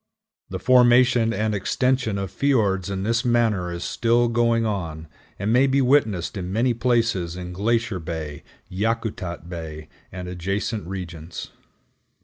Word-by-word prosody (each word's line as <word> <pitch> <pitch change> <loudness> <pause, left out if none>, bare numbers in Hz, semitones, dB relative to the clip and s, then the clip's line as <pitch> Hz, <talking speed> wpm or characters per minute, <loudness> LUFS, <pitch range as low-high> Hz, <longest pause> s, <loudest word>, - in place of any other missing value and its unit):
The - - -4
formation 125 -2 +5
and 110 +1 0
extension 120 +2 0
of 95 -2 -4
fiords 100 -7 +1
in 95 -1 -3
this 115 +3 +1
manner 115 -7 +1
is 85 0 -5
still 120 0 +2
going 115 0 +2
on, 85 -7 -3 0.3
and 105 +3 0
may 130 +3 +5
be 135 +1 +2
witnessed 120 - +2
in 90 -2 -4
many 120 +4 +2
places 115 -8 0
in 90 0 -6
Glacier 115 +1 0
Bay, 80 -3 -5 0.3
Yakutat 100 -4 -3
Bay, 80 -3 -7 0.2
and 90 0 -6
adjacent 95 +3 -3
regions. 85 -3 -7
105 Hz, 135 wpm, -23 LUFS, 90-120 Hz, 0.3 s, formation